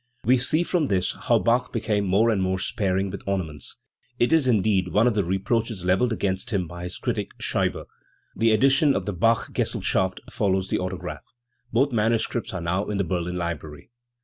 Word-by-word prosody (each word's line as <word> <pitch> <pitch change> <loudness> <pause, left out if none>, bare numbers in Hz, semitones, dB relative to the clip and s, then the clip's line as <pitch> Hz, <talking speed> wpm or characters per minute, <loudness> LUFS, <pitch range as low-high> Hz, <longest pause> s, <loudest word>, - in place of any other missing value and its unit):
We 125 +2 +4
see 155 +6 +1
from 170 -4 0
this 95 -4 +1
how - - +1
Bach 120 +2 +1
became 105 -3 0
more 105 +5 +3
and 100 -3 0
more 95 0 0
sparing 95 0 -1
with 100 - -6
ornaments; 85 -7 -3 0.4
it 120 +5 +2
is, 160 -5 +4
indeed, 105 -5 +2
one 105 +5 +2
of 125 - +3
the 105 -2 +1
reproaches 95 +2 -1
levelled 95 +7 +2
against 100 +1 -1
him 100 -6 0
by 85 +2 -7
his 90 - -5
critic - - -3
Scheibe. - - -1 0.5
The 115 0 +3
edition 135 +5 +4
of 95 - -2
the 105 - -2
Bachgesellschaft 95 -2 0
follows 95 -2 0
the - - 0
autograph. 90 -1 -6 0.4
Both 135 +5 +2
manuscripts 115 +1 0
are 95 - -4
now 90 +4 -1
in 105 - -2
the 100 - +1
Berlin 90 0 -2
Library. 80 -1 -5
100 Hz, 180 wpm, -24 LUFS, 90-115 Hz, 0.5 s, We